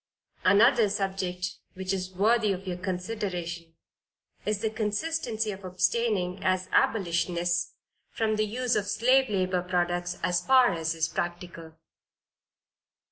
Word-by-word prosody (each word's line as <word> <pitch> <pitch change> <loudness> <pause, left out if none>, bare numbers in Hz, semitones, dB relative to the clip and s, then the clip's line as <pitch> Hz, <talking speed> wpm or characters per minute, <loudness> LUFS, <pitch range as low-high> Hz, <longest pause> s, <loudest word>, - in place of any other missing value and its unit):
Another 225 +1 +5
subject 185 -3 -2 0.2
which 190 +1 -3
is 185 -1 -3
worthy 215 +2 +3
of 190 +1 -7
your 180 -2 -3
consideration 180 -3 -4 0.7
is 210 -1 0
the 220 -1 0
consistency 220 +1 -1
of 195 0 -9
abstaining, 185 0 0
as 185 0 +1
Abolitionists, 175 -3 +1 0.3
from 220 -1 0
the 215 0 +1
use 245 +3 -1
of 205 -1 0
slave 255 +5 +3
labor 185 -3 0
products, 175 0 -1
as 175 0 +1
far 255 -2 +5
as 165 0 -2
is 160 -1 0
practicable. 175 -1 -5
185 Hz, 125 wpm, -27 LUFS, 175-215 Hz, 0.7 s, Another